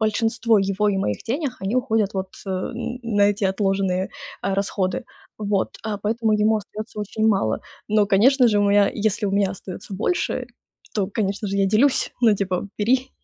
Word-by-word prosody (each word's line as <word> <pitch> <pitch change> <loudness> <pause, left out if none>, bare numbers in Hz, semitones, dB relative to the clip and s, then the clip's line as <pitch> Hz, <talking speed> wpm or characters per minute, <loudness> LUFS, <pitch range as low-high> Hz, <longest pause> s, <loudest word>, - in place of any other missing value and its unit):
большинство 225 +1 +2
его 195 +2 +1
и 200 - +1
моих 105 - -1
денег, 270 +1 -2
они 195 +5 -1
уходят 225 -5 +1
вот 190 -1 -3
н 230 +6 -4
на 210 -3 +1
эти 205 0 -2
отложенные, 190 -1 0 0.3
а, 195 0 0
расходы. 200 +3 -1 0.3
Вот, 205 -2 -1
а 215 -2 -2
поэтому 220 +2 0
ему 215 +1 +3
остается 215 +1 -7
очень 215 +1 -2
мало. 190 - +1 0.3
Но, 210 -1 +3
конечно 245 +6 +5
же, 210 - +2
мы, 200 0 +3
а, 200 - +4
если 210 0 0
у 195 - -1
меня 200 -1 +2
остается 195 0 -8
больше, 250 - -1 0.5
то, 200 -3 0
конечно 205 0 -2
же, 200 0 -2
я 195 -1 +3
делюсь, 240 +7 +3
ну, 225 -4 +5
типа: 190 -1 -2
"Бери", 255 +5 +1
205 Hz, 175 wpm, -23 LUFS, 195-225 Hz, 0.5 s, конечно